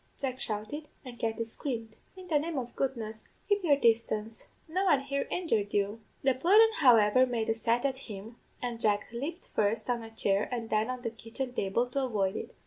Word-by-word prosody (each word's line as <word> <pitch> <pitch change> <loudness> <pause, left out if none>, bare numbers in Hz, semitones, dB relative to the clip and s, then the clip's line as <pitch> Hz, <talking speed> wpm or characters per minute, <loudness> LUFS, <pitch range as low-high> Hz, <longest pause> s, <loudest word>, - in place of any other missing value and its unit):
Jack 260 -2 -3
shouted, 220 +8 -3 0.2
and 240 -2 -9
Katty 225 0 -1
screamed. 225 -1 -5 0.2
'In 370 -1 -10
the 310 -4 +3
name 320 0 -3
of 245 -2 -4
goodness, 225 -5 -3 0.2
keep 410 -2 +2
your 300 -5 +5
distance; 225 -3 +1 0.2
no 365 +4 0
one 290 -8 +4
here 280 0 -2
injured 225 - 0
you!' 205 +2 0 0.2
"The 265 -1 +4
pudden, 410 - +5
however, 250 -2 +6
made 230 -3 -1
a - - +4
set 230 +3 0
at 265 -1 0
him, 220 -1 -9 0.3
and 235 -2 -3
Jack 205 -1 +1
lepped 300 +9 -5
first 215 +3 0
on 240 -1 -1
a 225 - -8
chair 205 -2 0
and 230 -2 -4
then 215 +2 +2
on 255 -1 -4
the 230 - -2
kitchen 230 +4 -5
table 200 +3 +1
to 275 +1 0
avoid 200 -6 0
it. - - -6
235 Hz, 200 wpm, -30 LUFS, 220-275 Hz, 0.3 s, however